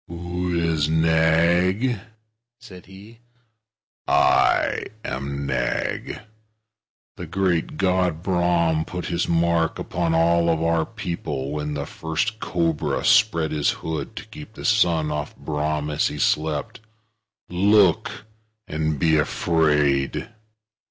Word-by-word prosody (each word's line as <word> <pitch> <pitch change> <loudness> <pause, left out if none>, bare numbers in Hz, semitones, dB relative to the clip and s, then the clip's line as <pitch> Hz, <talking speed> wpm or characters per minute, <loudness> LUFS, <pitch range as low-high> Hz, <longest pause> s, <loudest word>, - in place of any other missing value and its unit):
"Who 85 0 -3
is 80 -3 0
Nag?" 85 +8 +2 0.6
said 95 -8 -13
he. 100 +4 -14 0.9
"I - - +3 0.2
am 70 +2 -4
Nag. - - -2 1.0
The - - -7
great 90 -4 -1
God 90 -3 0
Brahm 85 -3 +1
put 90 +2 -6
his 85 0 -1
mark 85 0 +1
upon 85 -2 -1
all 85 +1 +3 0.2
our 85 -1 +1
people, 85 -10 -5
when 75 0 -3
the 70 -1 -3
first 80 +10 -3
cobra 85 -6 -1
spread 80 -1 +3
his 75 -2 +1
hood 80 -3 -4
to - - -7
keep 90 +9 -12
the - - -8
sun 85 -9 +2
off 75 -1 -4
Brahm 75 0 -2
as 75 - +1
he - - -5
slept. 75 -1 -1 0.7
Look, 100 +1 +2 0.4
and 75 0 -2
be 80 +2 +3
afraid!" 75 -3 +1
85 Hz, 110 wpm, -23 LUFS, 75-90 Hz, 1.0 s, I